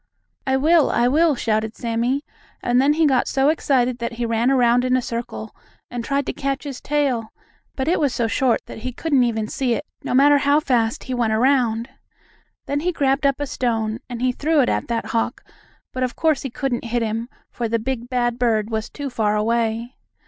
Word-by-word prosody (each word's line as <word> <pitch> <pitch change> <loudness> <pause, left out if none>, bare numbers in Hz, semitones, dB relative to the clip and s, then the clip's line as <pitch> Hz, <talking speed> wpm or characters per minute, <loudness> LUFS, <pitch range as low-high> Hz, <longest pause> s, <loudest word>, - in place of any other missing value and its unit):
"I 265 0 +3
will! 315 +2 +4
I 240 +1 +2
will!" 310 +3 +3
shouted 220 -2 -1
Sammie, 240 +4 -1 0.4
and 245 +1 +3
then 285 +2 +4
he 320 +1 +2
got 265 -4 +2
so 270 +1 +2
excited 255 -5 +1
that 235 0 -3
he 235 +1 -3
ran 230 +2 +1
around 245 -2 +4
in 255 0 +2
a - - +2
circle, 235 -2 -5 0.4
and 240 -1 -4
tried 280 +2 -1
to - - -3
catch 275 -1 -2
his 275 -4 -6
tail, 270 -7 0 0.4
but 265 +1 -2
it 345 - +2
was 285 -3 +2
so 235 - 0
short 240 +1 +1
that - - -9
he 250 +2 -5
couldn't 280 -2 +2
even 220 -3 -1
see 245 0 0
it, - - -5 0.2
no - - -1
matter 285 +2 +6
how 285 +1 +3
fast 245 -3 0
he 260 - -4
went 235 -3 +1
around. 235 -1 +2 0.8
Then 285 - -1
he 355 +4 0
grabbed 275 -2 +1
up 275 0 0
a 290 - -1
stone, 225 -4 -1
and 245 0 -5
he 255 - +3
threw 305 +5 +1
it 250 - +2
at - - -1
that 230 -1 -2
hawk, 230 - -1 0.5
but 255 - -4
of 255 -1 -1
course 315 -3 +1
he 270 - -4
couldn't 245 -1 -3
hit 235 0 -1
him, 225 +2 -3 0.2
for 235 - -3
the 230 - +1
big, 240 +1 -4
bad 240 -1 0
bird 225 -3 +1
was 220 +1 -2
too 285 -2 -6
far 215 -3 +1
away. 230 +2 -1
245 Hz, 215 wpm, -21 LUFS, 230-275 Hz, 0.8 s, matter